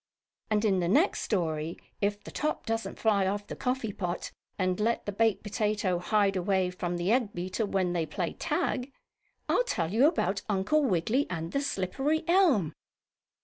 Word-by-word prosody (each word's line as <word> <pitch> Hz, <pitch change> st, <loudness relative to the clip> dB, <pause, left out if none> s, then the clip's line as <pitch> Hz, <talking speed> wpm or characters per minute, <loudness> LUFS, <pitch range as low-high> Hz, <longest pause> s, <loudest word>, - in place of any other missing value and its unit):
And 215 Hz, 0 st, +2 dB
in 195 Hz, -3 st, +3 dB
the 175 Hz, -, 0 dB
next 290 Hz, -, +3 dB
story, 165 Hz, -5 st, -1 dB, 0.2 s
if 205 Hz, 0 st, 0 dB
the -, -, -9 dB
top 305 Hz, +1 st, -2 dB
doesn't 225 Hz, 0 st, -2 dB
fly 200 Hz, -4 st, +2 dB
off 205 Hz, +1 st, -2 dB
the -, -, -7 dB
coffee 250 Hz, -5 st, -2 dB
pot 180 Hz, -2 st, -3 dB, 0.3 s
and 185 Hz, -1 st, 0 dB
let 230 Hz, +2 st, 0 dB
the 205 Hz, -, -2 dB
baked 215 Hz, -1 st, +1 dB
potato 210 Hz, -3 st, 0 dB
hide 195 Hz, +2 st, +2 dB
away 185 Hz, 0 st, +1 dB
from 175 Hz, -1 st, -3 dB
the 175 Hz, +4 st, 0 dB
egg 235 Hz, -4 st, +2 dB
beater, 185 Hz, +5 st, -2 dB
when 185 Hz, -3 st, 0 dB
they 165 Hz, -2 st, 0 dB
play 175 Hz, +1 st, -3 dB
tag, 290 Hz, -5 st, -1 dB, 0.6 s
I'll -, -, +3 dB
tell 175 Hz, -, -2 dB
you 250 Hz, +6 st, +6 dB
about 200 Hz, -, 0 dB
Uncle 210 Hz, +10 st, +2 dB
Wiggily 220 Hz, -, +1 dB
and 165 Hz, -1 st, -4 dB
the 280 Hz, -, 0 dB
slippery 275 Hz, -, -1 dB
elm. 320 Hz, -, +4 dB
205 Hz, 175 wpm, -29 LUFS, 180-235 Hz, 0.6 s, you